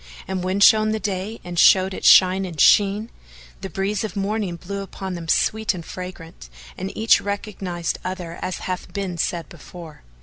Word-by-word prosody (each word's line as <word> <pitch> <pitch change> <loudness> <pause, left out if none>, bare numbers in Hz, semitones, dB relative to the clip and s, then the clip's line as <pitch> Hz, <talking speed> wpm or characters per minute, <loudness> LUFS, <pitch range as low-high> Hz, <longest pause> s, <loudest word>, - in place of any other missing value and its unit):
And 190 -1 -3
when 185 +2 -1
shone 215 +1 +5
the 220 - -2
day 205 +2 -4
and 175 -1 -4
showed 190 0 +5
its - - -1
shine 185 +1 +6
and 170 -5 -7
sheen, 205 +3 +4 0.5
the 195 - -5
breeze 195 +4 -2
of 215 -2 -5
morning 200 -2 -2
blew 200 +4 -6
upon 190 -1 -7
them 170 -2 -7
sweet 220 +4 +1
and 170 -2 -8
fragrant, 170 - -9 0.3
and 190 +1 -5
each 220 +1 +4
recognised 195 -4 -4
other 180 -2 -6
as 185 - -4
hath 185 -1 -5
been 190 -4 -4
said 170 -1 -2
before. 165 -4 -12
190 Hz, 175 wpm, -22 LUFS, 175-200 Hz, 0.5 s, shine